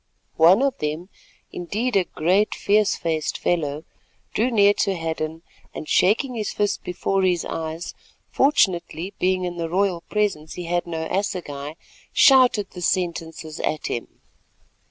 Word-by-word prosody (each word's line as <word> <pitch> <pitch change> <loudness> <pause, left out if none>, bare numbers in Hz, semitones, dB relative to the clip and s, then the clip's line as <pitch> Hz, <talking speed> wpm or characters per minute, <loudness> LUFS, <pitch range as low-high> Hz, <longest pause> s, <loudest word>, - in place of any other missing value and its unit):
One 180 +9 +6
of 275 -1 0
them, 155 +5 -3 0.4
indeed, 215 +8 -2
a 190 -2 +3
great 185 +7 +1
fierce 210 -1 +2
faced 160 -2 -2
fellow, 150 -3 -1 0.5
drew 235 +4 +1
near 205 -4 +5
to 195 - +1
Hadden 160 -1 -4 0.3
and 155 - -6
shaking 230 +7 +2
his 220 -3 -3
fist 205 -1 -1
before 190 +2 -1
his 180 -2 +1
eyes—fortunately 175 - -1
being 185 0 +1
in 175 -1 -4
the 165 -1 -3
royal 185 -1 0
presence 200 -8 -1
he 180 - -6
had 175 +1 -1
no 160 -1 -3
assegai—shouted 195 - +1
the 180 - -9
sentences 165 -3 -2
at 155 - -2
him. 120 - -3
180 Hz, 135 wpm, -23 LUFS, 160-205 Hz, 0.5 s, One